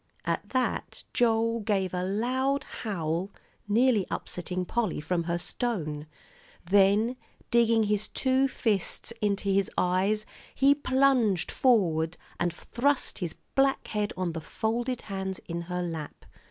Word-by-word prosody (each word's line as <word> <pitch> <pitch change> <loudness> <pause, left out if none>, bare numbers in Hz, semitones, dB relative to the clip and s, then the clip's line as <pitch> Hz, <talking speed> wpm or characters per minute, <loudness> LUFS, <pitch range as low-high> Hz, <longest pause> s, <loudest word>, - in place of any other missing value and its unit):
At - - -2
that 255 -1 -1
Joel 230 -1 +2
gave 200 -4 0
a 180 0 -1
loud 260 +8 0 0.2
howl, 175 -3 -2 0.4
nearly 225 -1 +3
upsetting 180 +1 -3
Polly 220 -5 -1
from 170 +2 -1
her 170 0 0
stone; 165 - -3 0.6
then, 205 +6 +4 0.3
digging 230 -2 +4
his 210 0 0
two 265 +1 +2
fists 220 -3 -1
into 200 -1 0
his 195 -1 +2
eyes, 195 +4 +2 0.3
he 275 +1 +6
plunged 260 - +2
forward 175 -9 +2 0.2
and 175 0 +1
thrust 260 - -1
his 175 -4 -3 0.2
black 270 0 +2
head 210 -1 -1
on 180 -2 -1
the 165 0 -5
folded 240 +8 -2
hands 190 -2 -4
in 170 0 -3
her 180 0 -1
lap. 165 -4 -6
205 Hz, 130 wpm, -28 LUFS, 180-240 Hz, 0.6 s, he